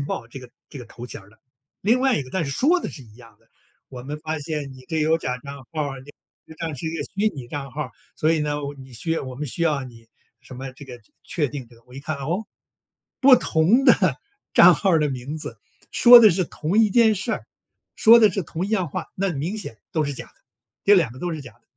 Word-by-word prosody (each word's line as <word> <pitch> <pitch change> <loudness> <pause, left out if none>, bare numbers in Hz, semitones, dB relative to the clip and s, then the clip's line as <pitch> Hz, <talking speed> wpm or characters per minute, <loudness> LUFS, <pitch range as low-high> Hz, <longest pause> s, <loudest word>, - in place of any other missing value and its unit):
电 - - -2
报 125 -4 -4
这 135 - -9
个 125 -1 -13 0.2
这 - - -11
个 125 - -8
头 120 +1 -10
衔 - - -8
儿 95 - -19
的。 110 - -24 0.4
另 230 +6 +2
外 265 -2 +3
一 - - -1
个， 130 - -13
但 185 +1 -1
是 140 - -4
说 320 - +2
的 - - -4
是 140 - -10
一 110 -3 -18
样 115 -3 -17
的： - - -33 0.4
“我 125 -2 -9
们 145 +4 -6
发 155 0 -3
现 150 -2 -5
你 130 -1 -14
这 160 - -1
有 155 +1 +3
假 125 -5 -4
账 140 +2 -9 0.2
号， 145 -4 -3
你 130 - -14 0.4
实 - - -12
际 - - -28
上 165 -3 -4
是 150 - -6
一 160 +1 -3
个 - - -3
虚 205 +2 0
拟 130 -4 -8
账 140 0 -6
号。 145 -1 -5 0.3
所 155 +1 +2
以 160 - +1
呢， 150 0 -1 0.2
你 130 -1 -13
需 160 +8 -5
要 165 - -1
我 130 -1 -7
们 150 +2 -4
需 155 +6 -3
要 150 -5 +1
你 115 -2 -14 0.3
什 130 - -12
么 135 0 -7
这 135 +3 -12
个 125 -3 -11 0.2
确 150 -5 -2
定 135 -2 -7
这 120 - -19
个。” 115 - -23
我 125 - -16
一 135 - -7
看， 155 +2 -4
哦， 170 +10 -3 0.7
不 265 -1 +8
同 205 +6 +2
的 - - +4 0.4
账 - - +8
号 190 -5 +2
的 150 -1 +1
名 130 +4 -5
字， 155 - -7 0.3
说 245 0 +9
的 220 -3 +7
是 185 +1 0
同 170 +5 -2
一 220 -2 +5
件 220 +1 +4
事 205 +3 -2
儿 - - -5 0.5
说 230 +2 +7
的 215 -3 +6
是 190 +2 -2
同 170 +2 -4
一 205 - -7
样 185 -7 0
话， - - -5
那 195 -1 -1
明 165 +9 -3
显 115 - -8
都 160 - +1
是 145 -1 -3
假 - - -8
的。 - - -22 0.5
这 205 - +6
2 165 - +2
个 130 - -12
都 175 +5 -3
是 155 -2 -6
假 125 -4 -12
的， 100 - -31
150 Hz, 280 characters per minute, -23 LUFS, 130-185 Hz, 0.7 s, 说